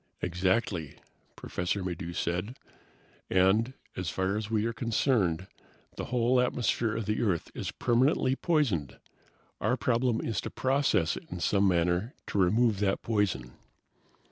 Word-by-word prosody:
"Exactly," 90 -3 -1 0.4
Professor 90 +2 -3
Maddox 85 -1 -4
said, 90 +9 -2 0.7
"and, 100 +7 +3 0.2
as 90 -3 -3
far 95 +5 -1
as 105 0 -3
we 110 -1 +1
are 115 - -1
concerned, 110 - +1 0.5
the - - -4
whole 125 +1 +2
atmosphere 120 -2 0
of 115 - -3
the 105 +1 -1
Earth 95 -8 0
is - - -4
permanently 130 +2 +2
poisoned. 135 - 0 0.6
Our 125 - +1
problem 120 +1 +1
is 115 - -2
to - - -5
process 130 - +1
it - - -11
in 90 - -5
some 100 +4 +2
manner 90 - +1
to 100 - -1
remove 105 +3 +3
that 100 -1 0
poison. 95 - -1
105 Hz, 140 wpm, -29 LUFS, 90-120 Hz, 0.7 s, and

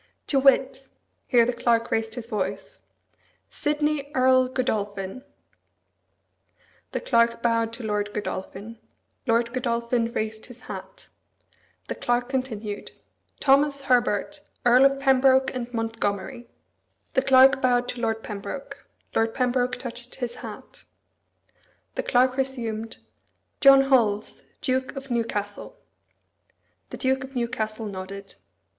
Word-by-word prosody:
"To 275 - +2
wit 270 0 +3 0.2
" - - -47
Here 240 -3 +5
the 245 - 0
Clerk 235 -1 +1
raised 225 0 -1
his 245 -3 -5
voice. 195 -3 -4 0.7
"Sidney 295 -1 -1
Earl 255 0 +4
Godolphin." 210 -3 -3 1.7
The - - -2
Clerk 235 -1 +2
bowed 230 -1 +1
to 235 +1 -7
Lord 210 -1 -1
Godolphin. 210 +2 -6 0.5
Lord 235 +1 +2
Godolphin 235 -1 0
raised 220 -1 -4
his 245 -1 -14
hat. - - -9 0.8
The - - -2
Clerk 245 +1 -1
continued, 225 -6 -3 0.5
"Thomas 280 +1 +3
Herbert, 250 +2 +1 0.2
Earl 250 +2 +7
of 275 0 +3
Pembroke 265 -1 +4
and 245 -1 -5
Montgomery." 225 -1 -3 0.6
The 265 - +3
Clerk 265 0 +6
bowed 245 -1 +2
to 245 - -5
Lord 225 -1 -1
Pembroke. 210 +6 -7 0.3
Lord 225 0 +1
Pembroke 250 -1 +1
touched 245 0 -7
his 245 -2 -5
hat. - - -10 1.1
The - - -2
Clerk 255 +1 +2
resumed, 230 -4 -2 0.6
"John 275 -1 +8
Holles, 230 -6 +1 0.2
Duke 260 +1 -1
of 270 -1 -8
Newcastle." 225 - -2 1.1
The - - -7
Duke 265 0 0
of 265 0 -10
Newcastle 225 -2 -2
nodded. 195 0 -7
240 Hz, 120 wpm, -25 LUFS, 225-260 Hz, 1.7 s, John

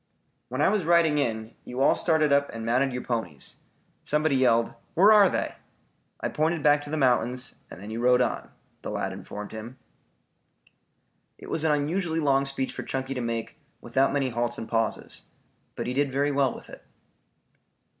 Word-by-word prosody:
"When 130 +4 -1
I - - +5
was 205 -2 +1
riding 165 -2 +4
in, 110 -4 -2
you 125 - -7
all 135 - +5
started 155 -3 +2
up 140 0 +3
and 115 0 -6
mounted 130 +4 +2
your 125 0 -4
ponies. 95 - -4 0.4
Somebody 150 -1 +1
yelled, 115 -3 +3 0.2
'where 195 +5 +7
are 205 -3 +7
they?' - - -2 0.7
I - - -2
pointed 160 0 0
back 145 0 +5
to 145 - -9
the 155 - -2
mountains, 125 -2 +1
and - - -10
then 105 +3 -8
you 115 - -4
rode 125 +1 +4
on," 125 - -1 0.3
the - - -6
lad - - -3
informed 105 0 -8
him. 110 +4 -8 1.6
It - - -10
was 160 - 0
an 160 - +3
unusually 160 +3 0
long 140 -2 +2
speech 135 -1 -2
for - - -5
Chunky 135 0 -3
to 125 - -3
make 115 +5 -4 0.2
without 135 0 +1
many 140 -2 0
halts 120 0 -2
and 115 - -6
pauses. 115 -1 -2 0.5
But - - -4
he 125 - -2
did 140 +1 +1
very 140 +2 +1
well 140 -2 +2
with - - -11
it. - - -12
135 Hz, 185 wpm, -26 LUFS, 120-150 Hz, 1.6 s, where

